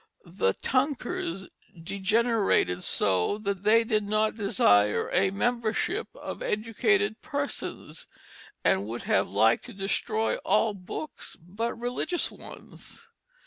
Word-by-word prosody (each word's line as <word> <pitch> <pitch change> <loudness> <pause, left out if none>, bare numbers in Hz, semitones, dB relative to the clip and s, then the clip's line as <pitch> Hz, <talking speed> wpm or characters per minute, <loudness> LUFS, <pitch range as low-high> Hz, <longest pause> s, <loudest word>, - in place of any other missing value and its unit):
The 170 - 0
Tunkers 245 - -1 0.3
degenerated 200 - +1
so 95 - +1
that 200 -3 -3
they 220 +3 +5
did 220 -2 +1
not 215 +1 +1
desire 105 - +3
a 190 +1 +3
membership 240 - -1
of - - -7
educated 230 - 0
persons, 285 -2 -5 0.6
and 100 +2 +2
would 115 +2 -5
have 95 - +2
liked 110 +3 +3
to - - -10
destroy 215 +3 -1
all 220 - +2
books 195 +10 -7
but 205 +9 -4
religious 250 +9 -1
ones. - - -13
210 Hz, 110 wpm, -27 LUFS, 175-235 Hz, 0.6 s, they